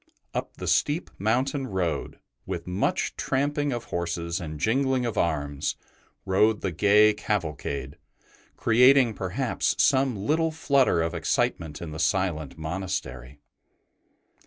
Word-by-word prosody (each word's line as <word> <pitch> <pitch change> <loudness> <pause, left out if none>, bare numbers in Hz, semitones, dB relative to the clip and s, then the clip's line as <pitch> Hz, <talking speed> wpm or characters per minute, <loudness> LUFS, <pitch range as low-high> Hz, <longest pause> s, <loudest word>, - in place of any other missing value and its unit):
Up - - -4
the - - -6
steep 150 +5 +1
mountain 130 +6 0
road, 90 -6 -2 0.3
with - - -4
much 90 +2 -1
tramping 145 +2 0
of 120 -2 -3
horses 85 0 -2
and 75 -3 -6
jingling 130 - +1
of 115 - -2
arms, 75 -3 -1 0.5
rode 105 +3 +3
the 95 - -1
gay 105 +5 +5
cavalcade, 75 -10 -3 0.6
creating 125 +1 +5
perhaps 100 +7 -1
some 135 -3 +3
little 155 +11 +1
flutter 140 - +2
of 80 +1 -2
excitement 80 -1 -1
in 80 - -6
the 80 - -7
silent 85 -4 0
monastery. 80 -6 -5
95 Hz, 120 wpm, -26 LUFS, 85-130 Hz, 0.6 s, gay